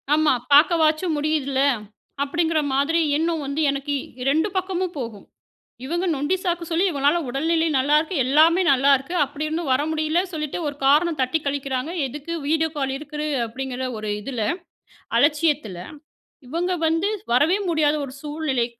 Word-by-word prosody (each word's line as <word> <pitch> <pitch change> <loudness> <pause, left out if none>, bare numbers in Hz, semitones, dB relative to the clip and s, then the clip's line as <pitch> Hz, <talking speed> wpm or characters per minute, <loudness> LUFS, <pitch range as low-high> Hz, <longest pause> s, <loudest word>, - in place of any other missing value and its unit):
ஆமா. 310 -2 +3 0.2
பார்க்கவாச்சும் 315 +2 +4
முடியுதுல்ல. 290 -3 0 0.6
அப்டிங்கிற 320 +2 0
மாதிரி 285 +5 +2 0.2
எண்ணம் 325 0 0
வந்து 280 +3 -2
எனக்கு 280 +1 -2 0.3
2 315 +6 +2
பக்கமும் 370 -1 -2
போகும். 230 -5 -7 0.6
இவங்க 345 +6 -1
நொண்டி 290 +6 0
சாக்கு 350 -2 -1
சொல்லி 340 +3 +2
இவங்களால 285 0 +2
உடல்நிலை 320 +5 +1
நல்லாருக்கு 300 +6 +2
எல்லாமே 315 +7 +5
நல்லாருக்கு, 275 +3 +3
அப்டியிருந்தும் 305 +3 -3
வர 255 - +2
முடியல 310 +2 +1
சொல்லிட்டு 305 0 -3
ஒரு 290 - -4
காரணம் 305 +3 +3
தட்டி 260 +5 +1
கழிக்கிறாங்க, 275 0 -2 0.2
எதுக்கு? 295 +5 -7
வீடியோ 320 +1 +2
கால் 270 -2 -1
இருக்குது 300 +1 -5 0.2
அப்டிங்கிற 260 +2 -4
ஒரு 215 0 -5
இதுல 240 -1 -3 0.8
அலட்சியத்துல. 295 - +1 0.7
இவங்க 345 +6 -1
வந்து 330 +5 +1 0.2
வரவே 295 +10 +4
முடியாத 305 -2 +2
ஒரு 260 - -10
சூழ்நிலை. 295 -5 -1
300 Hz, 135 wpm, -23 LUFS, 275-325 Hz, 0.8 s, எல்லாமே